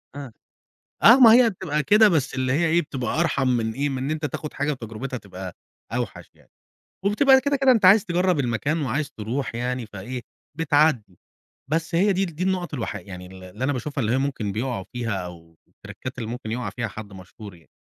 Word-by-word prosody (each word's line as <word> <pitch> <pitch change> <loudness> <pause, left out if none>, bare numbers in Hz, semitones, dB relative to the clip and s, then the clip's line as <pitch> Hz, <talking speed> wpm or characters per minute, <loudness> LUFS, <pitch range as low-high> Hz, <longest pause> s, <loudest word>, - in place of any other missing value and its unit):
آه، 140 -4 -7 0.7
آه، 235 +4 +9
ما 230 -3 +9
هي 240 0 +6
بتبقى 165 -6 -2
كده 210 +5 +6
بس 160 -9 0
اللي 130 -1 0
هي 165 +5 +2
إيه، 170 +2 +3
بتبقى 135 -1 -3
أرحَم 140 -6 +1
من 115 -3 0
إيه، 140 +4 -1
من 135 -2 -3
إن 140 - -2
أنت 155 -1 -2
تاخد 150 +1 -6
حاجة 145 +1 -1
وتجرُبتها 125 +1 -6
تبقى 95 -4 -9 0.4
أوحش - - -4
يعني، - - -26 0.6
وبتبقى 265 +7 +5
يا - - +5
كده، 285 +2 0
كده 270 -1 +4
أنت 220 -6 +3
عايز 205 +3 +7
تجرّب 180 -2 +1
المكان 135 +5 -1
وعايز 140 +2 -2
ترُوح 115 +3 -4
يعني، 125 0 -3
فإيه، 110 +5 -7 0.4
بتعدّي، 145 - +1 0.5
بس 165 +1 -1
هي 195 +4 +3
دي 190 +1 0
ال 170 -4 -7
دي 170 - -5
النقط 180 -4 -1
الوحي 120 - -4
يعني 90 -2 -9
ال 95 0 -12
اللي 105 +7 -6
أنا 145 - +1
باشوفها 140 +3 -4
اللي 110 +1 0
هي 130 - +2
ممكن 130 -7 -2
بيقَعوا 115 -2 -3
فيها 120 -3 -3
أو 85 -2 -13
التريكّات 130 0 -10
اللي 115 -3 -4
ممكن 120 -2 -6
يُقع 115 -3 -3
فيها 120 +2 -4
حد 105 -1 -9
مشهور 95 +2 -11
يعني. 85 -2 -21
135 Hz, 210 wpm, -24 LUFS, 110-165 Hz, 0.7 s, آه